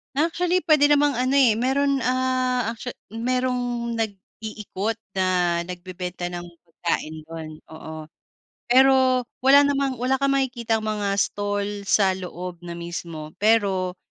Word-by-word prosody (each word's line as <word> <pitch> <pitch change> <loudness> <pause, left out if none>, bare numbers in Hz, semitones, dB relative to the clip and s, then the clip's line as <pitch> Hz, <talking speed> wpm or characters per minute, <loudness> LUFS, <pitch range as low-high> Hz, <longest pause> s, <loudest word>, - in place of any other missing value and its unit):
Actually, 345 +4 +1
puwede 305 -4 +5
namang 290 0 +4
ano, 255 +1 0
eh, 240 -6 +5
mayro'n, 275 +2 +1
ah, 255 -1 0
actua 235 +2 -7 0.2
mayrong 245 0 -1
nag-iikot 215 0 -4 0.2
na 180 -2 +1
nagbebenta 180 0 -6
ng 175 0 -6 0.2
pagkain 165 -2 -3
do'n, 160 -1 -7 0.2
oo. 160 -1 -9 0.6
Pero 260 0 +5 0.2
wala 275 +2 +7
namang 275 -2 0
wala 260 +3 0
kang 275 0 +2
makitang 235 -5 -1
mga 205 -2 -1
stall 205 0 -2
sa 195 -2 +4
loob 180 -1 -7
na 175 -1 -7
mismo. 170 -2 -6
Pero 195 -4 +2
225 Hz, 125 wpm, -24 LUFS, 180-260 Hz, 0.6 s, wala